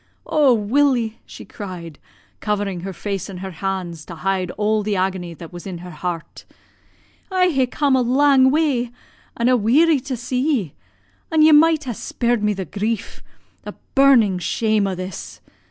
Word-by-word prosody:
Oh, 295 -4 +3
Willie!' 235 0 +1
she - - -11
cried, 175 -7 -8 0.4
covering 205 -3 -2
her 190 +3 -5
face 195 +1 -4
in 190 - -7
her 190 +1 -6
hands 175 -2 -4
to 170 - -9
hide 185 +2 -1
all 215 +1 +1
the 210 0 -1
agony 185 -2 -2
that 165 +1 -11
was 175 +2 -8
in 185 -2 -5
her 180 +1 -9
heart. 170 +1 -6 0.9
'I 365 -2 +2
ha' 265 -4 +1
come 280 0 +1
a 260 - +3
lang 260 +1 +4
way, 275 -5 +1 0.5
an' 235 - +1
a 255 - +5
weary 280 +8 +4
to 260 -1 -5
see 250 +2 -2
ye, 255 - 0 0.6
an' 315 -1 +4
ye 315 - +7
might 310 +1 +5
ha' 250 -3 -4
spared 235 +1 -1
me 210 0 +2
the 190 -1 -4
grief 210 +4 -4 0.4
the - - -9 0.2
burning 245 -9 +5
shame 215 +3 0
o' 190 - -2
this. 185 0 -7
215 Hz, 170 wpm, -21 LUFS, 185-265 Hz, 0.9 s, ye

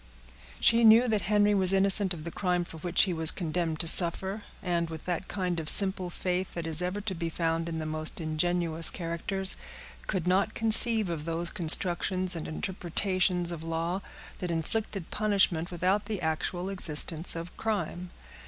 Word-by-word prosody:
She 230 0 +3
knew 225 +3 +6
that 215 -3 0
Henry 210 0 +3
was 190 -2 +3
innocent 195 0 +4
of 165 -4 -3
the 170 - -6
crime 180 -1 -1
for 165 - -10
which 175 +2 +2
he 185 - -1
was 160 -1 +4
condemned 165 -2 -3
to 165 - -5
suffer, 190 +5 +3 0.2
and, 170 -2 -1
with 160 -1 -8
that 180 +1 -3
kind 180 -3 -3
of 155 -2 +2
simple 190 -2 +2
faith 180 +1 -4
that 170 -1 -5
is 165 +1 0
ever 180 +3 -3
to 205 -2 -4
be 165 -1 -4
found 165 0 -2
in 165 - -5
the 160 - -5
most 155 0 -3
ingenuous 165 +1 +2
characters, 185 +3 -2 0.5
could 185 -4 -2
not 190 +4 0
conceive 225 -1 +5
of 165 -3 -5
those 170 +1 -2
constructions 180 +1 +2
and 165 - -6
interpretations 180 +1 -1
of 170 -2 -7
law 165 +3 -3 0.4
that 180 - -4
inflicted 180 +3 -4
punishment 195 -6 +1
without 185 +4 -1
the 215 -3 -4
actual 175 +2 -3
existence 165 -3 +1
of 165 +1 -8
crime. 200 -5 -4
180 Hz, 170 wpm, -28 LUFS, 165-195 Hz, 0.5 s, knew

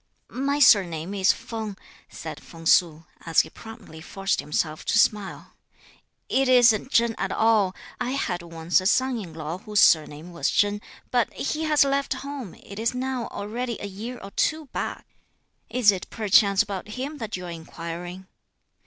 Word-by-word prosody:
"My 280 +1 +1
surname 190 - +4
is 195 +1 +4
Feng," 220 -3 -6 0.3
said - - -8
Feng 165 -1 -13
Su, 165 -1 +3 0.2
as 165 -1 +4
he - - -11
promptly 220 -8 -12
forced 195 +4 -2
himself 155 +2 -2
to - - +2
smile; 210 -2 +1 0.7
"It 270 -1 +1
is'nt 245 -2 +5
Chen 235 -3 +3
at - - -1
all: 215 -4 +2 0.2
I - - -2
had 180 -10 -2
once 165 +1 0
a 185 - 0
son 260 +2 +2
in 185 -6 -8
law 160 +2 -5
whose 210 +1 -1
surname 155 +1 +3
was 170 - 0
Chen, 205 0 +1 0.3
but 245 -2 +1
he 310 +3 -2
has 300 -2 +4
left 275 0 0
home, 275 -9 -6
it 200 +1 -11
is 230 +3 0
now 255 -1 -2
already 235 +3 -4
a - - -5
year 215 +6 -6
or 195 - -9
two 315 +7 0
back. - - -4 0.6
Is 245 -5 +5
it 190 -2 -6
perchance 200 -1 +4
about 200 -3 -6
him 285 +4 -5
that 220 -3 -4
you 180 - -7
are 175 - -6
inquiring?" 170 +2 -7
205 Hz, 170 wpm, -25 LUFS, 175-245 Hz, 0.7 s, is'nt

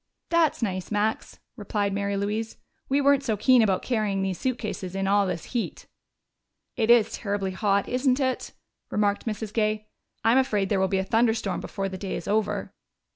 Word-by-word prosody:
"That's 330 -7 +2
nice, 185 -4 -2
Max," 210 +1 -1 0.2
replied 205 -1 -2
Mary 200 0 -1
Louise. 215 +3 -2 0.3
"We 275 +2 +3
weren't 280 -1 +4
so 225 -6 -1
keen 250 +3 +5
about 195 -4 +2
carrying 210 -5 0
these 190 -2 -2
suitcases 215 -7 -3
in 195 0 -1
all 200 0 +3
this 175 -3 -3
heat." 240 -3 -3 0.9
"It 225 -1 0
is 235 -2 +5
terribly 200 -3 -2
hot, 200 0 +1
isn't 255 +1 +1
it?" 260 -2 -1 0.4
remarked 205 +1 0
Mrs. 215 -1 -4
Gay. 215 -1 0 0.3
"I'm 230 +4 +5
afraid 210 -7 +1
there 200 - +2
will 190 - +3
be 195 - 0
a 190 - +1
thunderstorm 225 -2 +1
before 195 -1 -3
the 190 -1 -6
day 195 -1 -3
is - - -6
over." 210 -1 -1
210 Hz, 180 wpm, -26 LUFS, 195-230 Hz, 0.9 s, keen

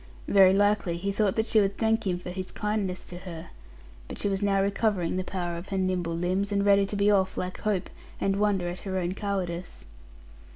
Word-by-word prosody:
Very 190 -2 +6
likely, 200 -3 +2
he 200 +3 -2
thought 200 -1 +1
that 220 - +1
she 215 -1 +4
would 195 0 0
thank 225 -1 +1
him 180 -1 0
for 180 0 -7
his 185 0 -5
kindness 210 -3 -2
to 175 - -8
her. 170 -3 -9 0.6
But - - -7
she 205 - 0
was 195 0 -1
now 200 -1 +2
recovering 195 -3 0
the 185 - -1
power 175 -2 -3
of 175 +3 -8
her 195 - -3
nimble 180 -3 0
limbs; 185 +4 -1
and 200 0 +1
ready 200 -1 +5
to 205 - -3
be 205 +1 +3
off 190 -2 +2
like 185 0 -4
hope, 210 -4 0 0.3
and 195 0 +1
wonder 200 -4 +1
at 175 +1 -5
her 190 -1 -4
own 180 0 -1
cowardice. 185 -4 -4
195 Hz, 215 wpm, -27 LUFS, 180-205 Hz, 0.6 s, Very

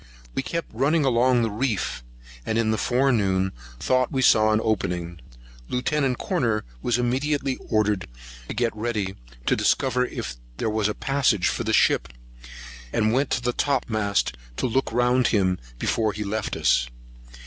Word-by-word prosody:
We - - -1
kept 165 +5 -4
running 145 +6 +2
along 125 -1 +3
the 115 - 0
reef, 110 - -2 0.4
and 110 - -1
in 115 -1 +2
the 110 - 0
forenoon 105 -8 +2 0.3
thought 130 -1 +1
we 130 -1 0
saw 110 -2 +5
an 110 - +3
opening. 85 -5 -2 0.5
Lieut. 125 +3 -1 0.3
Corner 120 - 0 0.2
was 120 - +1
immediately 135 +2 0
ordered 105 -3 +1 0.4
to - - -5
get 115 0 0
ready, 105 -4 -2 0.3
to - - +3
discover 125 -2 +2
if - - -6 0.2
there 110 - -1
was 105 -1 +1
a 105 - -2
passage 135 -9 +1
for - - -2
the - - -1
ship, - - +3 0.8
and 110 - +1
went 135 +2 +1
to 125 - -1
the 120 0 0
topmasthead, 110 - 0 0.2
to - - -1
look 130 +1 0
well 120 +2 +2
round 125 0 +3
him 95 -4 +1 0.2
before 110 - 0
he 105 - -4
left 105 +1 -3
us. - - +2
115 Hz, 160 wpm, -24 LUFS, 105-130 Hz, 0.8 s, saw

